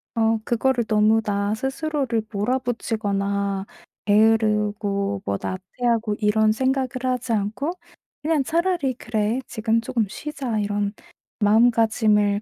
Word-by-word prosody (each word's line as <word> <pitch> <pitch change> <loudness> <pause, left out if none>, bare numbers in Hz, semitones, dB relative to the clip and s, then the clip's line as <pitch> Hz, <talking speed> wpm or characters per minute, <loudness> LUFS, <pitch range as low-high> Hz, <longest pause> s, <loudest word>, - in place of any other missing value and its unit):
어 225 -1 +2
그거를 240 0 +1
너무 215 +1 +3
나 205 -1 -1
스스로를 265 -1 -1
몰아붙이거나 200 -4 -1 0.4
게으르고 210 -2 +2
뭐 100 - -1
나태하고 220 +4 -1
이런 215 0 +3
생각을 260 +3 +1 0.2
하지 255 -2 -1
않고 220 - -1 0.5
그냥 305 -2 +1
차라리 335 -4 0
'그래 220 +2 -1
지금 225 +1 0
쪼금 230 -2 -1
쉬자.' 265 -2 -4
이런 205 0 -1 0.5
마음가짐을 215 -2 +3
220 Hz, 265 characters per minute, -23 LUFS, 205-250 Hz, 0.5 s, 너무